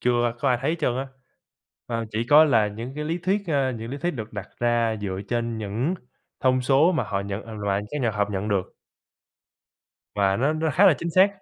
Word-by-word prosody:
chưa 120 -1 +2
có 140 - +2
ai 125 -2 +2
thấy 155 +5 0
trơn 125 -5 +1
á. 135 +1 -3 0.8
À, 115 -1 -2
chỉ 110 +2 -1
có 150 +5 +7
là 115 -8 +3
những 115 +5 -7
cái 150 +1 -4
lý 165 +3 -2
thuyết, 195 +4 0
ơ, 140 -4 +1
những 115 0 -6
lý 140 - -5
thuyết 175 - 0
được 115 -8 -7
đặt 100 -2 -6
ra 120 -2 +2
dựa 95 -2 -3
trên 115 -1 -1
những 110 - -1 0.5
thông 130 0 +3
số 140 +7 +4
mà 165 - 0
họ 100 -2 -2
nhận 100 +1 -5
à, 115 - -8
loại 100 -1 -1
các 150 - -3
nhà 120 -3 +1
học 105 -1 -1
nhận 100 +1 -2
được. 100 -3 -1 1.4
Và 100 -1 +2
nó 140 +7 +2
nó 155 0 0
khá 175 +8 +5
là 180 - +7
chính 170 - -3
xác. 185 +4 +6
120 Hz, 225 wpm, -24 LUFS, 105-150 Hz, 1.4 s, có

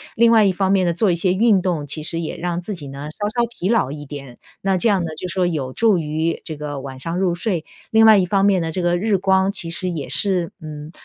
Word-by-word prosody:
另 235 0 +5
外 220 -2 +6
一 195 - +4
方 190 +1 0
面 190 -2 +3
呢， - - +2
做 180 +3 +1
一 - - +1
些 180 +2 +1
运 205 -2 +3
动 170 -6 -1
其 145 +2 -3
实 165 +2 -2
也 160 - -4
让 175 0 -2
自 205 +4 -5
己 150 -6 -8
呢 140 +2 -7
稍 205 +5 -3
稍 235 +2 0
疲 200 -4 -4
劳 225 - +2
一 145 0 -7
点， 135 -4 -9 0.2
那 195 0 +1
这 225 +6 +2
样 195 -4 +2
呢 160 - -4
就 180 - -4
说 180 +1 0
有 145 -7 -2
助 215 - +2
于 160 +2 -2
这 155 -2 -7
个 145 -1 -5
晚 130 -1 -8
上 170 +5 -3
入 180 -3 +1
睡。 180 -3 -2 0.3
另 225 0 +6
外 215 - +8
一 190 - +3
方 195 +2 +1
面 195 -3 +3
呢， 160 - -3
这 185 - -3
个 175 0 +1
日 200 0 +1
光 190 0 +2
其 185 -4 -5
实 180 +2 -1
也 155 -7 -4
是， 180 +2 +1
嗯， 150 0 -8
175 Hz, 295 characters per minute, -20 LUFS, 155-195 Hz, 0.3 s, 外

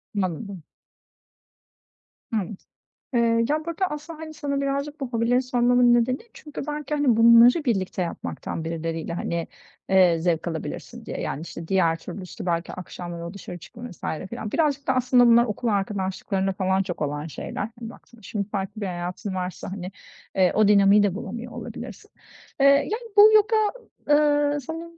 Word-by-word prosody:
Anladım. 190 -1 -3 1.7
Hı. - - +2 0.8
Eee, 230 -1 +3
ya, 305 +1 0
burada 335 +3 -1
aslında, 300 +2 -7
hani, 315 -1 -8
sana 285 -2 -2
birazcık 280 +2 -2
bu 270 - -3
hobilerin 235 +1 +2
sormamın 245 -1 +3
nedeni, 240 +2 +2 0.2
çünkü 300 -2 -8
belki, 300 0 -3
hani, 275 -6 +3
bunları 235 +6 +7
birlikte 195 -6 0
yapmaktan 170 -1 -4
birileriyle, 165 0 -3
hani, 170 0 -3 0.4
eee, 185 -3 +5
zevk 165 0 0
alabilirsin 160 -2 -6
diye. - - -5
Yani, 145 - -3
işte, 165 0 -8
diğer 170 -3 +2
türlüsü 185 +1 -8
belki 170 -1 -1
akşamları 175 -1 -7
o 170 - -7
dışarı 180 -3 -8
çıkma 235 +8 -10
vs. 175 - -16 0.3
filan. 220 -3 -5
Birazcık 290 -3 0
da 260 - +3
aslında 250 -1 +4
bunlar 235 0 +6
okul 230 +2 -3
arkadaşlıklarında 195 -1 -1
falan 190 0 +1
çok 175 -3 -6
olan 145 +1 -2
şeyler, 145 - -6 0.2
hani, 230 -2 -6
baktığında. 235 0 -16
Şimdi 200 +1 -4
farklı 200 +1 -4
bir - - -1
hayatın 180 +2 -4
varsa, 180 0 -4
hani, 190 -1 -6 0.4
eee, 185 -2 +4
o 215 -1 +5
dinamiği 200 0 +6
de 195 -3 +1
bulamıyor 235 +3 -6
olabilirsin. - - -8 0.5
Eee, 275 - +4
yani, 435 - +2
bu 420 +1 +9
yoga, 430 +2 +4 0.5
eee, 290 0 +3
sanırım, 330 +4 -7
225 Hz, 160 wpm, -24 LUFS, 185-275 Hz, 1.7 s, bu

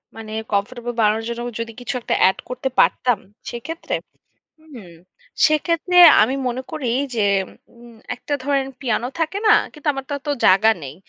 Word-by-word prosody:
মানে 220 -1 -9 0.2
কমফোর্টেবল 240 +4 -2
বানানোর 215 +1 +2
জন্য 235 0 -4 0.2
যদি 230 0 -4
কিছু 245 - -4
একটা - - -1
এড 190 - -3
করতে 250 +1 -3
পারতাম 245 -5 +3 0.3
সেক্ষেত্রে? 320 +8 -5 0.6
হুম। 255 - -13 0.5
সেক্ষেত্রে 335 +3 0 0.3
আমি 255 +5 +1
মনে 250 +1 -4
করি 280 -6 -3 0.3
যে, 225 - -1 0.6
উম 235 -1 -15 0.2
একটা 290 +4 -4
ধরেন 275 -2 0
পিয়ানো 245 -2 -1
থাকে 325 +5 -1
না, 425 - +7 0.2
কিন্তু 300 0 -6
আমার 270 -1 -6
তো - - -5
অতো 290 +1 -5 0.2
জায়গা 195 +4 +5
নেই। 135 0 -7
245 Hz, 155 wpm, -20 LUFS, 225-290 Hz, 0.6 s, না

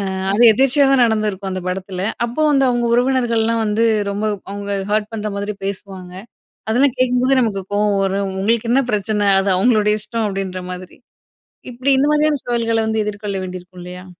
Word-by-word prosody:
அ - - -4 0.2
அது 230 - +3
எதேர்ச்சையா 270 +3 +3
தான் 265 -2 +5
நடந்திருக்கும், 210 -3 -1
அந்த 185 0 -4
படத்தில. 185 0 -4 0.2
அப்போ 240 +6 -3
வந்து 270 -2 +3
அவுங்க 240 -1 0
உறவினர்கள்லாம் 235 -3 +1
வந்து 220 +2 +1 0.3
ரொம்ப 205 +2 -3 0.3
அவுங்க 200 0 -5 0.2
ஹர்ட் 215 +1 0
பண்ற 215 -1 -3
மாதிரி 205 +1 -4
பேசுவாங்க. 190 -2 -7 0.6
அதெல்லாம் 250 +3 +2
கேட்கும்போது 255 +1 +2
நமக்கு 205 -5 -1
கோவம் 205 -1 +1
வரும். 195 0 -1
உங்களுக்கு 230 +3 0
என்ன 270 +2 +3
பிரச்சன? 210 0 0
அது 195 +1 0
அவுங்களுடைய 215 0 +2
இஷ்டம் 220 +1 -3
அப்பிடின்ற 195 -2 -4
மாதிரி. 180 0 -9 0.7
இப்பிடி 255 +3 -1
இந்த 285 - +2
மாதிரியான 300 -1 +2
சவால்கள 230 -2 0
வந்து 220 -1 0
எதிர்கொள்ள 205 -1 -4
வேண்டியிருக்கும் 180 0 -9
இல்லயா? 180 +1 -9
215 Hz, 165 wpm, -18 LUFS, 195-240 Hz, 0.7 s, தான்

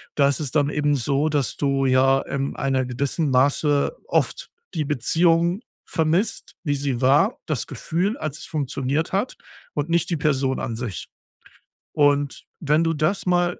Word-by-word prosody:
da 140 -2 +4
ist 140 - 0
es 145 -5 -3
dann 145 -2 +2
eben 145 -1 +1
so, 140 +3 +1
dass 145 -5 -1
du 135 -1 +1
ja 135 +1 +4
im 140 0 -3
einer 135 -1 0
gewissen 140 +5 -1
Maße 140 - +2
oft - - 0 0.2
die 155 - -1
Beziehung 165 - +2 0.2
vermisst, 170 +7 -1
wie 145 -4 0
sie 140 -3 -2
war, 135 +4 +4
das 155 -6 -2
Gefühl, 190 - -2
als 155 - -5
es - - -8
funktioniert 140 +1 -2
hat 200 +6 -1 0.4
und 145 +2 -2
nicht 170 0 +1
die 170 - 0
Person 135 -3 0
an 115 - -3
sich. 115 -5 -5 0.8
Und 145 -1 +1
wenn 155 +1 +2
du 165 0 +1
das 155 +6 0
mal 175 -1 +1
145 Hz, 165 wpm, -23 LUFS, 135-165 Hz, 0.8 s, da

